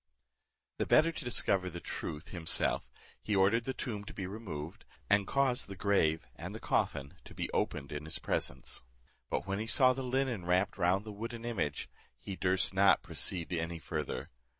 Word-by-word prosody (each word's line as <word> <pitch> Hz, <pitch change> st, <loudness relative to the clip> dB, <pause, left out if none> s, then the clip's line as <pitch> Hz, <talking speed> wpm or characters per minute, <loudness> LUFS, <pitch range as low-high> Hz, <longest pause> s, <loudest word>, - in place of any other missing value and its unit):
The -, -, +1 dB
better 165 Hz, +2 st, +6 dB
to 160 Hz, -, -6 dB
discover 100 Hz, -6 st, +2 dB
the 85 Hz, 0 st, -6 dB
truth 75 Hz, -2 st, -5 dB
himself, 85 Hz, -4 st, -1 dB, 0.3 s
he 105 Hz, -, 0 dB
ordered 100 Hz, +5 st, +4 dB
the 130 Hz, -, -1 dB
tomb 105 Hz, -5 st, -3 dB
to -, -, -9 dB
be 95 Hz, -, -3 dB
removed, 90 Hz, -6 st, -6 dB, 0.3 s
and 100 Hz, -1 st, +5 dB
caused 135 Hz, -3 st, +3 dB
the 100 Hz, -, -7 dB
grave 85 Hz, -5 st, +2 dB
and -, -, -6 dB
the -, -, -5 dB
coffin 70 Hz, 0 st, 0 dB
to -, -, -12 dB
be -, -, -2 dB
opened 70 Hz, -, -1 dB
in 75 Hz, +1 st, -4 dB
his 80 Hz, -, -3 dB
presence; 65 Hz, +1 st, -2 dB, 0.5 s
but -, -, -1 dB
when 100 Hz, +1 st, -1 dB
he 110 Hz, -, -3 dB
saw 130 Hz, +2 st, +5 dB
the 135 Hz, -, -4 dB
linen 130 Hz, -5 st, 0 dB
wrapped 90 Hz, +3 st, +2 dB
round 95 Hz, +3 st, +3 dB
the 105 Hz, -, -6 dB
wooden 115 Hz, +2 st, -5 dB
image, 85 Hz, -12 st, -1 dB, 0.3 s
he 100 Hz, -, -6 dB
durst 95 Hz, +1 st, +2 dB
not 100 Hz, +1 st, +5 dB
proceed 90 Hz, -2 st, -2 dB
any 85 Hz, 0 st, -1 dB
farther. 80 Hz, -1 st, -4 dB
95 Hz, 180 wpm, -33 LUFS, 85-115 Hz, 0.5 s, better